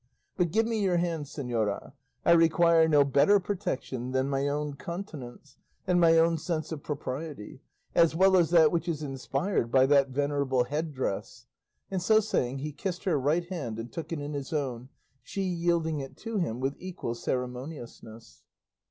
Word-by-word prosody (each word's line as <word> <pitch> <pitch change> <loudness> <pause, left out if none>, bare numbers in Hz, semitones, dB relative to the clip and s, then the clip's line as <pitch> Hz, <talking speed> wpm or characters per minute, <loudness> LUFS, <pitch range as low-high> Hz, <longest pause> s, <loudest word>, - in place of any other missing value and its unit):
But 175 -3 +1
give 220 +7 +2
me 225 -1 -1
your 185 -3 +2
hand, 170 -3 -1
señora; 120 -8 -3 0.3
I - - +5
require 165 0 +5
no 150 -3 +5
better 140 +9 +4
protection 175 - -4
than 130 +1 +1
my 140 0 0
own 145 0 -2
continence, 145 - -8 0.3
and 180 -1 +2
my 165 -1 +6
own 165 0 +3
sense 155 -1 -3
of 155 -3 -5
propriety; 140 -4 -6 0.3
as 165 -1 +4
well 190 +2 +5
as 175 -3 +4
that 165 -3 +6
which 170 0 -1
is 155 -3 -2
inspired 135 - -2
by 130 0 +5
that 140 -1 +4
venerable 140 -2 +1
head 150 +5 -3
dress;" 130 -8 -4 0.5
and 190 -2 -1
so 215 +4 +5
saying 135 - -1
he 150 +3 -4
kissed 175 +5 -4
her 165 -7 +1
right 155 +6 +1
hand 135 - -4
and 115 +1 -6
took 165 -1 -6
it 165 - -2
in 145 +1 -5
his 140 +1 -5
own, 130 -5 -3 0.3
she 195 +10 -4
yielding 170 -3 0
it 135 -1 -8
to 225 -1 -4
him 125 -10 -2
with 135 +1 -1
equal 180 -10 -5
ceremoniousness. 125 - -6
150 Hz, 175 wpm, -28 LUFS, 135-170 Hz, 0.5 s, my